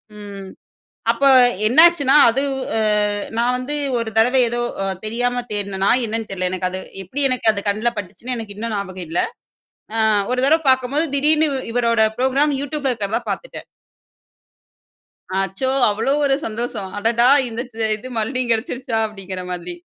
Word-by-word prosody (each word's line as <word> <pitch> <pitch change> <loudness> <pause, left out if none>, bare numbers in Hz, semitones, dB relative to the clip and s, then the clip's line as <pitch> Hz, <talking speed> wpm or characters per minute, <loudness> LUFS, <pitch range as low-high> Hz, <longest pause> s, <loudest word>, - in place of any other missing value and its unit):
ம் 200 -2 -9 0.6
அப்போ 275 - +1 0.4
என்னாச்சுன்னா, 290 +1 +5 0.2
அது 265 +4 -1 0.4
அ - - +1 0.6
நான் 240 +2 +2
வந்து 260 +4 -4 0.2
ஒரு 230 -1 -3
தடவ 240 +4 +3 0.2
ஏதோ, 240 0 -2 0.2
அ - - -1 0.2
தெரியாம 245 +2 -1
தேடுனனா, 200 -1 -1 0.2
என்னனு 225 0 -4
தெரில, 185 -1 -1
எனக்கு 185 0 -1
அது 185 +1 -5 0.2
எப்படி 255 +11 -4
எனக்கு 250 -3 +2
அது 200 - -4
கண்ல 215 +4 0
பட்டுச்சுன்னு 205 +6 -6
எனக்கு 215 -3 -7
இன்னும் 225 +1 -4
ஞாபகம் 185 -3 -5
இல்ல. 165 - 0 0.8
அ - - +1 0.3
ஒரு 250 - 0
தடவ 320 +4 +3
பாக்கும்போது 260 +4 +2
திடீர்னு 305 +2 +3 0.3
இவரோட 235 -2 +2 0.2
புரோகிராம், 270 +4 +2
யூட்யூப்ல 285 -1 -2
இருக்கிறத 210 -2 -2
பாத்துட்டேன்! - - -6 1.8
அச்சோ! 195 +7 -2 0.2
அவ்ளோ 220 +6 0
ஒரு 275 -1 +3
சந்தோஷம். 225 -2 -4
அடடா! 230 +3 +2 0.2
இந்த 230 0 -5 0.2
எ - - +3
இது 220 +4 -10
மறுபடியும் 250 +2 -1
கெடைச்சிருச்சா 230 +1 -2
அப்டீங்குற 195 -3 -7
மாதிரி. 175 0 -5
230 Hz, 145 wpm, -20 LUFS, 205-255 Hz, 1.8 s, என்னாச்சுன்னா